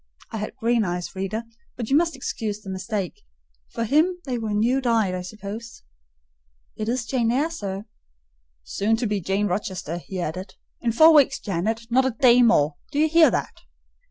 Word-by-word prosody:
(I - - -4
had 215 +2 -5
green 235 -2 +1
eyes, 180 -1 -4
reader; 195 +4 -3 0.3
but 235 0 -5
you - - +5
must 330 0 +2
excuse 220 -5 -4
the 195 -2 -7
mistake: 195 - -4 0.5
for 230 - -3
him 315 +10 +2
they 250 -3 -2
were 220 -1 -3
new 235 +6 +2
dyed, 225 -6 +2
I 180 - -3
suppose.) 210 +5 -8 0.9
"It 215 +1 -3
is 240 -1 -1
Jane 235 -1 +1
Eyre, 290 +7 +1
sir." 200 -9 -5 0.8
"Soon 205 - 0
to 235 +2 -2
be 205 -2 -1
Jane 195 +4 0
Rochester," 180 -3 -3
he 185 +2 -7
added: 185 +3 -5 0.2
"in 235 - 0
four 315 +8 +7
weeks, 275 -2 +5
Janet; 210 +4 -2
not 260 +2 +4
a 250 - -3
day 250 -3 +6
more. 150 -11 +3
Do 285 - -4
you 310 +1 +4
hear 325 0 +6
that?" - - -3
225 Hz, 185 wpm, -24 LUFS, 195-255 Hz, 0.9 s, four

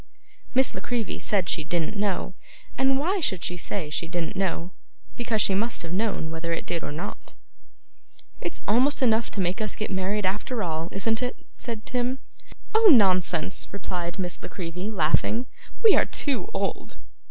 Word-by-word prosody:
Miss 265 0 +4
La - - -5
Creevy 240 -3 -2
said 195 -5 +1
she 160 - -1
didn't 170 +5 -1
know. 200 -2 -1 0.4
And 265 0 +3
why 360 +8 +1
should 190 - +1
she 180 - -1
say 175 -2 -3
she 165 - -1
didn't 175 +3 -3
know? 185 -2 -1 0.4
Because 230 -3 +1
she 195 - +2
must 225 +2 0
have 165 0 -5
known 195 -5 0
whether 165 +1 -3
it 165 - -2
did 170 -2 -2
or - - -3
not. 155 +4 -6 1.1
'It's - - -4
almost 260 +6 +4
enough 225 -2 +3
to - - -5
make 185 +2 0
us 215 - -1
get 215 - -3
married 190 +2 0
after 215 +5 -1
all, 165 0 -2
isn't 220 +4 0
it?' 250 0 -1 0.2
said 230 -3 -5
Tim. 250 +1 0 0.6
'Oh, 440 0 +6
nonsense!' 185 - +3
replied 180 -2 -4
Miss 180 -3 -3
La - - -7
Creevy, 180 +2 -4
laughing. 220 +5 +2 0.4
'We 440 -3 +8
are - - +5
too 285 - 0
old. - - -3
200 Hz, 175 wpm, -26 LUFS, 175-235 Hz, 1.1 s, We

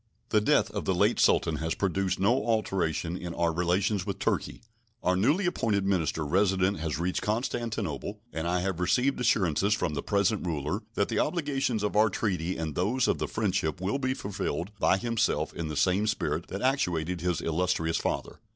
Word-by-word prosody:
The 105 - +3
death 105 - +3
of - - -4
the - - +1
late - - +2
Sultan 80 -2 +3
has 80 +1 -2
produced 95 -1 0
no 115 +7 +3
alteration 90 -7 0
in 85 -2 -6
our 85 -1 +1
relations 90 +4 +1
with 100 0 -4
Turkey. - - -2 0.4
Our 90 - +2
newly 145 - +2
appointed 110 - 0
minister 80 -5 0
resident 95 +3 +2
has 80 -1 -2
reached 90 +3 -1
Constantinople, 105 - -2
and 80 +1 -2
I 90 +1 +1
have 95 -2 -2
received 125 +10 +2
assurances 100 -4 +2
from 90 -7 -2
the 70 - -2
present 100 +3 +1
ruler 75 -3 -2
that - - +1
the - - 0
obligations 135 - 0
of 105 - -1
our 110 +1 +5
treaty 90 -4 -1
and 80 -2 -3
those 110 - +1
of - - 0
friendship 95 -6 -1
will 100 +9 -1
be 130 -1 0
fulfilled 100 - -3
by 95 - +4
himself 115 +2 0
in 85 - -4
the 75 -1 -4
same 95 +6 +2
spirit 105 - -1
that 100 - -5
actuated 90 - 0
his 90 -1 0
illustrious 80 0 0
father. - - -3
95 Hz, 180 wpm, -28 LUFS, 85-110 Hz, 0.4 s, our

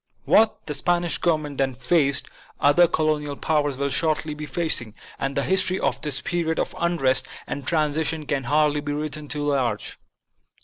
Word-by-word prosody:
What 220 0 +3
the 150 - -4
Spanish 175 +3 0
Government 155 -4 -1
then 135 -2 0
faced, 140 +1 +2 0.3
other 160 +5 +5
colonial 155 -3 0
powers 145 -3 0
will 140 0 -1
shortly 155 -2 0
be 150 0 -7
facing; 135 -11 -1 0.2
and 135 0 -2
the 140 - +1
history 185 +1 +1
of - - -1
this 150 -4 0
period 165 -2 -1
of - - -2
unrest 150 -7 +2 0.2
and 140 -1 -6
transition 155 -1 0
can 140 -2 -2
hardly 150 +2 +2
be 145 0 -3
written 150 0 -4
too 150 0 -3
large. 130 -7 -1
150 Hz, 165 wpm, -24 LUFS, 140-160 Hz, 0.3 s, other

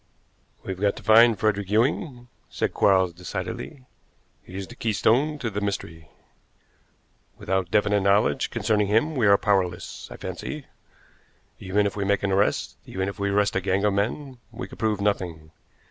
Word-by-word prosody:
"We've 95 0 -6
got 100 -1 +2
to - - -11
find 115 0 +6
Frederick 105 -3 0
Ewing," 120 - 0 0.2
said - - -2
Quarles 95 -3 +3
decidedly. 90 - -6 0.6
"He 90 - -13
is 95 0 -4
the - - -12
keystone 115 +8 +1
to 120 -5 -3
the 105 +1 -3
mystery. 85 -5 -4 1.3
Without 95 -2 -1
definite 105 0 +2
knowledge 100 +7 +2
concerning 105 -2 0
him 115 +10 +2
we 120 -6 +2
are 100 0 +6
powerless, 95 -4 -1
I - - -9
fancy. - - -6 0.9
Even 100 +2 0
if 100 - -2
we 100 - -2
make 100 0 +1
an 100 - 0
arrest, 100 +2 0
even 95 0 -3
if 100 +1 -6
we 100 0 0
arrest 100 0 +1
a 95 - +1
gang 95 +2 0
of 105 - +2
men, 125 +6 -2
we 115 - -7
could - - -13
prove 110 -3 0
nothing. 85 -6 -2
100 Hz, 165 wpm, -25 LUFS, 95-110 Hz, 1.3 s, find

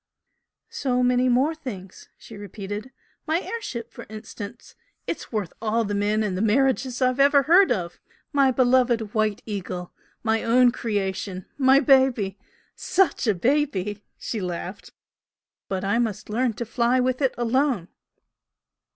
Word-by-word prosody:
"So 250 -2 0
many 250 0 +3
more 260 +6 +3
things!" 200 - -9
she 225 - -12
repeated 205 +3 -7 0.4
"My 320 +2 +2
air 465 +4 -5
ship 235 - -6
for - - -10
instance! 215 +1 -9 0.3
it's - - -5
worth 210 -7 -3
all 225 +1 +1
the 205 - -3
men 205 +2 +1
and 205 -3 -1
all 185 - -2
the 220 - +2
marriages 260 +2 +1
I've 255 +1 +1
ever 280 0 +5
heard 355 +5 +5
of! 175 -7 -2 0.3
My 275 -2 +4
beloved 245 -4 +2
'White 215 -2 0
Eagle!' 185 -4 -5 0.3
my 225 -1 +1
own 245 +1 +5
creation 195 -4 -3
my 270 0 +5
baby 255 -8 +3 0.4
SUCH 355 -9 +1
a 215 - +3
baby!" 210 - 0
She 220 - -4
laughed. 180 +1 -5 0.8
"But 190 -1 -3
I 200 +4 +1
must 220 -3 -2
learn 240 +1 +1
to 235 - -5
fly 240 +2 +1
with 255 +2 0
it 265 -2 +1
alone!" 240 - +1
235 Hz, 150 wpm, -24 LUFS, 205-260 Hz, 0.8 s, ever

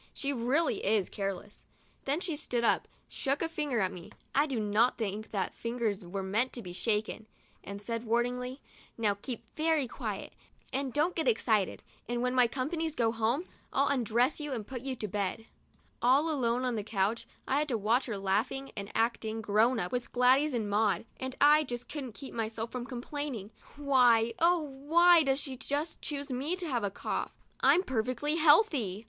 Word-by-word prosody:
She 280 0 -1
really 270 +7 +1
is 205 -2 +1
careless. 195 0 -5 0.4
Then 285 +5 0
she 345 -4 -1
stood 245 -5 -1
up, - - +2 0.2
shook 275 +4 -1
a - - +1
finger 295 -8 -1
at 185 - +1
me 175 -2 -10
— - - -38
I 300 - +1
do 260 -5 -2
not 215 +4 +2
think 215 -1 -3
that 195 -3 -2
fingers 230 -4 -2
were 190 +2 -4
meant 220 +7 0
to 240 - -5
be 180 -2 -7
shaken 215 +2 -1 0.2
— - - -34
and 200 +1 -7
said, 230 +1 -3
warningly: 250 +3 -1 0.2
" - - -23
Now 215 -3 +2
keep 230 +3 -6
very 315 -2 +2
quiet, - - -5 0.4
and 270 0 -1
don't 305 +7 +1
get 320 -5 -1
excited, 220 -4 +1 0.3
and 240 0 -1
when 250 0 +1
my 250 -2 +5
company 310 +7 -2
goes 230 -7 0
home, 235 +10 +1 0.3
ill 275 +1 +3
undress 245 +2 +1
you 295 -2 -4
and 225 -4 -4
put 250 +1 -6
you 265 0 -3
to 215 - -4
bed/' 205 +2 -2 0.6
All 275 +7 +4
alone 250 -3 0
on 250 - 0
the 210 - -2
couch, 210 +2 -1 0.2
I 275 - +2
had 300 - 0
to 245 -5 0
watch 225 +6 +1
her 220 -4 -3
laughing 215 +8 -1
and 200 0 -6
acting 225 -1 0
"grown 220 +3 +3
up" 175 - -3
with 245 -1 -3
Gladys 260 +3 +4
and 220 -3 -1
Maud, 205 0 +1
and 260 0 -4
I 300 +2 +6
just 245 -3 -5
couldn't 270 -6 -6
keep 275 - -9 0.4
from 250 -1 -5
complaining, 250 -4 -5 0.2
"Why, 245 -5 +4
oh 345 0 +4
why 320 +5 +4
does 270 -2 +1
she 265 -3 -6
just 290 +5 -3
choose 285 -1 -4
me 275 +8 -1
to 365 -2 -5
have 245 -6 -1
a 200 - +1
cough? 195 - -3 0.3
I'm 365 - +5
per 260 - 0
fectly 290 +7 -1
healthy." 295 - +4
245 Hz, 195 wpm, -31 LUFS, 220-285 Hz, 0.6 s, I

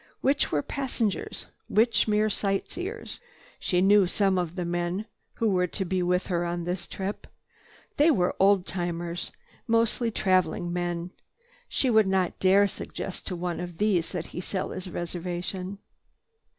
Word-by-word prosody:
Which 275 +2 +2
were 145 -1 +1
passengers, 240 -7 -2 0.2
which 225 0 +3
mere 215 0 +3
sightseers? 285 - -2 0.4
She 180 -1 +1
knew 200 -1 +6
some 195 0 +2
of 175 -1 -3
the 180 -2 -2
men 175 +4 -1 0.3
who 230 - +1
were 180 -1 +2
to 190 +2 -3
be 185 +1 0
with 180 +1 +1
her 175 -2 0
on 175 0 -2
this 175 0 -3
trip. 195 +2 -5 0.7
They 295 +3 +6
were 180 - +2
old 195 -1 +5
timers, 175 -2 -3 0.4
mostly 230 +1 +2
traveling 185 -4 +1
men. 175 0 -2 0.6
She 260 - +1
would 220 -3 +5
not 190 -2 +1
dare 195 +2 +5
suggest 190 -1 -6
to 185 - -2
one 175 0 -3
of 175 -1 -6
these 195 -5 +1
that 175 -3 -3
he 180 - -3
sell 185 0 -3
his 185 0 -6
reservation. 180 +2 -4
185 Hz, 150 wpm, -27 LUFS, 175-205 Hz, 0.7 s, knew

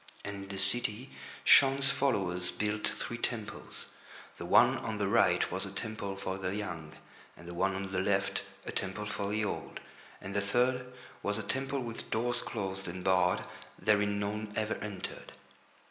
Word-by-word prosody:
And 100 0 -4
in 100 0 -8
the 100 - -4
city 105 +5 +2 0.3
Shaun's 140 0 +7
followers 95 -11 +1
built 105 +2 -1
three 120 - -4
temples. 115 -3 -4 0.5
The - - -5
one - - +6
on - - -3
the - - +1
right - - +4
was - - -1
a - - -4
temple 105 -3 -4
for 95 0 -3
the 95 +1 -2
young, 85 -7 -5 0.4
and 85 - -12
the 85 - -6
one 95 +2 +1
on 95 0 -4
the 95 - 0
left 95 0 +1 0.2
a - - -3
temple 100 +2 -3
for 100 -1 -2
the 105 +1 +1
old, - - -4 0.4
and 100 +1 -7
the 100 - +3
third 125 +4 +1 0.3
was 105 +1 0
a 110 - -3
temple 135 +3 -1
with 115 -2 -6
doors 120 +2 +1
closed 95 -3 -4
and 90 +1 -5
barred—therein 100 +2 +1
none 105 +1 -2
ever 110 0 0
entered. 105 -3 -6
100 Hz, 170 wpm, -32 LUFS, 95-110 Hz, 0.5 s, Shaun's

